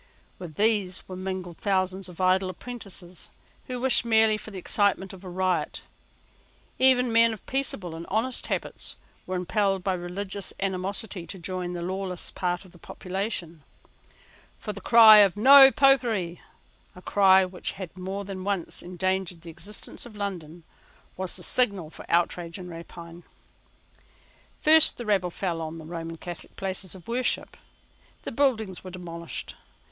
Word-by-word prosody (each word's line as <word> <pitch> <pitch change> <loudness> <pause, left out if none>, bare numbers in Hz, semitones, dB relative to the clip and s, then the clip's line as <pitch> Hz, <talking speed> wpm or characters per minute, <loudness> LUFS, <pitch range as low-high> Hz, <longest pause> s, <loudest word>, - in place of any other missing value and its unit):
With 170 -4 -9
these 205 -3 +1
were 185 - -7
mingled 185 -2 -5
thousands 190 -1 0
of 180 - -13
idle 185 0 +2
apprentices, 190 -4 -7 0.4
who 250 -2 -4
wished 260 0 +3
merely 220 -2 +4
for 215 - -8
the 200 - -9
excitement 195 +1 +1
of 190 0 -12
a 185 - -8
riot. 185 0 -1 1.0
Even 255 -2 +5
men 230 0 +5
of 215 - -11
peaceable 245 -10 -2
and 165 +1 -8
honest 230 +5 -1
habits - - -4 0.3
were 185 - -3
impelled 195 +1 0
by 190 - 0
religious 190 +2 -4
animosity 190 -1 -2
to 195 - -7
join 180 0 -4
the 175 -1 -5
lawless 185 0 -3
part 180 +1 -2
of 185 - -16
the 175 - -18
population. 185 -3 -4 1.0
For 210 - -6
the 200 - -9
cry 220 0 +9
of 200 -1 +5
No 270 +4 +9
Popery, 240 - +2 0.5
a 180 - -12
cry 190 -1 +5
which 180 -1 -5
has 185 -4 -7
more 190 +2 -5
than 190 -1 -6
once 195 -3 -3
endangered 185 -1 -2
the 170 0 -9
existence 205 +6 -4
of 220 - -14
London, 175 -5 -5 0.5
was 185 -1 -3
the 180 - -5
signal 200 -8 0
for - - -12
outrage 170 0 0
and 180 -2 -9
rapine. 170 0 -10 1.4
First 315 0 +7
the 240 - -6
rabble 195 -4 +1
fell 170 -2 -3
on 160 +1 -5
the 160 - -10
Roman 165 0 -6
Catholic 175 +1 -9
places 190 -1 -1
of 180 - -14
worship. 245 +2 -1 0.7
The - - -5
buildings 225 -8 0
were 185 - -8
demolished. 170 -2 -7
190 Hz, 155 wpm, -26 LUFS, 175-210 Hz, 1.4 s, cry